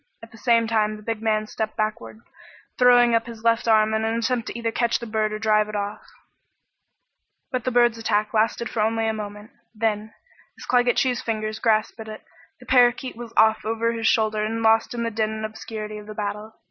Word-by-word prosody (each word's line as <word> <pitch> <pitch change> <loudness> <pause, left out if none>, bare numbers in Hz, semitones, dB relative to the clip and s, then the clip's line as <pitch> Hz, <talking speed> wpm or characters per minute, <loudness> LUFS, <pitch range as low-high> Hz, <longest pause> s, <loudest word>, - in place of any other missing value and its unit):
At 225 - -12
the 225 - -14
same 230 0 +3
time 215 -1 +1
the 210 - -14
big 225 0 -3
man 215 -1 +1
stepped 215 0 -4
backward, 215 +1 -3 0.6
throwing 245 -1 +6
up 230 0 +1
his 230 -1 -10
left 230 0 +2
arm 220 -1 +4
in 220 0 0
an 225 +1 0
attempt 235 -1 -1
either 230 -1 -2
to - - -24
catch 235 -1 +1
the 235 - -8
bird 215 -1 -1
or 215 - -3
drive 215 -1 +2
it 210 - -6
off. 205 +1 -3 1.5
But 255 -3 -3
the 255 - 0
bird's 240 -1 +3
attack 215 -1 0
lasted 225 +2 +1
for 220 - -2
only 225 +1 +1
a 220 - 0
moment. 210 +1 -8 0.2
Then, 215 -1 -1 0.5
as - - -10
Claggett 245 0 +2
Chew's 250 -2 +1
fingers 215 -1 -3
grasped 220 0 +1
at 220 - -8
it, 215 0 -9 0.4
the - - -15
parakeet 250 0 +3
was 235 0 -9
off 220 0 +4
over 230 +1 0
his 225 -1 -1
shoulder 215 -1 +2
and 225 +1 -2
lost 225 +2 +3
in 235 - -2
the 230 - -2
din 215 0 0
and 220 0 -4
obscurity 215 -1 -7
of 210 - -13
the 215 - -8
battle. 210 +1 -5
220 Hz, 215 wpm, -23 LUFS, 215-230 Hz, 1.5 s, throwing